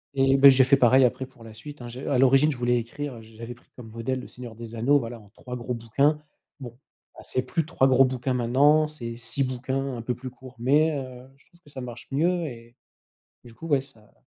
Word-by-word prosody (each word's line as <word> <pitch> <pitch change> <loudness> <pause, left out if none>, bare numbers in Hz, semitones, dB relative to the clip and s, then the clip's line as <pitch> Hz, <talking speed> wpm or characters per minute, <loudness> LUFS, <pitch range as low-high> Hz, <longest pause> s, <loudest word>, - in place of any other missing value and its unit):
Et 135 0 +3
bah, 140 0 +9
j'ai 130 0 +6
fait 135 +2 +4
pareil 130 +1 +5
après 130 +2 -1
pour 125 -3 -18
la 110 -1 -11
suite, 145 +3 -11
hein, 120 - -7
je 125 +2 -8
à 130 - +1
l'origine, 135 +3 +5
je 135 - -6
voulais 120 0 +1
écrire, 130 +4 -5
heu, 115 - -11
j'avais 115 +2 -10
pris 120 - -26
comme 120 -3 -11
modèle 115 +4 -3
le 125 - -9
Seigneur 120 -2 -10
des 115 0 -9
Anneaux, 140 +6 +3
voilà, 115 -1 -7
en 105 -2 -19
3 125 -1 -8
gros 125 0 -4
bouquins, 140 +7 +1 0.4
bon, 125 - -7 0.5
bah, - - -12
c'est 130 0 -3
plus 165 -3 -1
3 135 -4 +2
gros 135 +1 +5
bouquins 130 0 -2
maintenant, 145 +6 +3
c'est 120 -6 -7
6 120 +4 -4
bouquins 130 +1 -3
un 115 - -7
peu 125 - -1
plus 125 +2 -8
courts. 130 0 -14
Mais, 150 +6 +3
heu, 130 -2 -7
je - - -23
trouve 175 0 -27
que 145 - -20
ça 130 - -7
marche 120 -1 -9
mieux 170 +4 +1
et 120 -4 -10 0.7
du 120 -2 -14
coup, 165 +8 -9
ouais, 140 -3 +3
ça 110 -6 -20
130 Hz, 245 wpm, -25 LUFS, 120-140 Hz, 0.7 s, bah